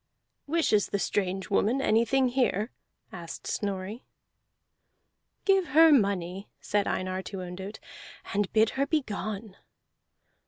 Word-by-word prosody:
"Wishes 285 -10 +2
the - - -1
strange 190 -1 -2
woman 225 +6 +2
anything 250 +2 +3
here?" 240 -3 0 0.4
asked 170 -3 -8
Snorri. 200 +3 -3 1.4
"Give 390 -3 +3
her 325 0 +9
money," 195 - +1
said 205 -1 0
Einar 185 0 -2
to 190 0 -7
Ondott, 190 +4 -7 0.6
"and 205 -1 0
bid 220 0 +3
her 280 - +2
begone." 215 - -3
205 Hz, 110 wpm, -28 LUFS, 190-250 Hz, 1.4 s, her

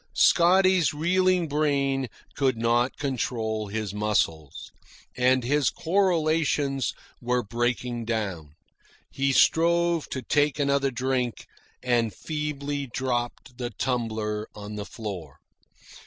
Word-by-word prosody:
Scotty's 185 -2 +4
reeling 180 +2 +2
brain 140 -3 0 0.2
could 130 -4 +1
not 120 +2 +1
control 115 -6 -2
his 105 -1 -4
muscles. 95 -8 -1 0.4
All 130 +1 +3
his 145 +3 +2
correlations 155 - +1 0.3
were 125 0 0
breaking 120 +1 -2
down. 95 -10 -3 0.6
He 135 0 0
strove 170 +3 +3
to 130 - -4
take 145 +2 +2
another 140 -1 +2
drink, 125 -1 -2 0.4
and 120 -3 +1
feebly 145 -2 -3
dropped 120 0 -3
the 120 -1 -2
tumbler 110 -3 -2
on 105 0 -8
the 105 -1 -5
floor. 95 - -7
130 Hz, 105 wpm, -26 LUFS, 115-150 Hz, 0.6 s, Scotty's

